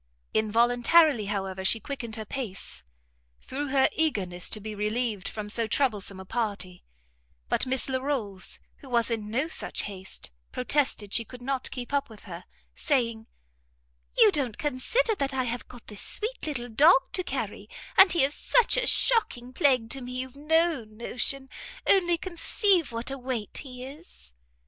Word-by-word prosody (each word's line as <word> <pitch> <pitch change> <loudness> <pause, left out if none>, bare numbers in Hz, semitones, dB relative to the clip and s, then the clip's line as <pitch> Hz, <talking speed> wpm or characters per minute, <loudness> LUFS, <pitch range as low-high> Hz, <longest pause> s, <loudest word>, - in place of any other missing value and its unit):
Involuntarily, 240 +5 +4
however, 195 -2 -3
she 225 +4 +5
quickened 245 -4 -5
her 220 -1 -6
pace, 195 - -4 0.6
through 285 +3 -4
her 270 -1 +4
eagerness 190 - 0
to 215 - -1
be 215 +1 -6
relieved 210 -1 -1
from 210 -1 -5
so 225 +2 0
troublesome 205 -6 0
a 190 - -9
party; 200 -5 -3 0.7
but - - +1
Miss 260 0 +2
Larolles, 260 -8 -1 0.2
who 270 - -13
was 235 -1 +1
in 215 -2 -2
no 260 +8 0
such 335 - -2
haste, 190 - -4 0.2
protested 250 -6 0
she 230 - +2
could 245 +2 -12
not 265 0 -2
keep 250 +1 -7
up 280 -3 +1
with 220 -2 -13
her; 180 -3 -9 0.3
saying, 230 -6 0 0.9
"You 210 - +7
don't 255 -5 -1
consider 330 - +1
that 275 -8 -2
I 260 - +1
have 245 0 -4
got 245 -2 -13
this 210 -2 -5
sweet 440 -4 -3
little 245 -5 -3
dog 270 +4 +5
to 365 - +1
carry, - - -4 0.3
and 385 0 +8
he 340 - +4
is 275 +2 +2
such - - +3
a - - +2
shocking 255 - +2
plague 255 -5 +2
to 270 - -2
me 250 0 -7
you've 255 +1 -5
no 320 -1 +2
notion. 240 +5 -3 0.4
Only 350 -3 +5
conceive 360 - +2
what 230 +3 -4
a 275 - -5
weight 245 -5 -3
he 255 -2 -8
is!" 275 - -12
250 Hz, 165 wpm, -27 LUFS, 215-285 Hz, 0.9 s, and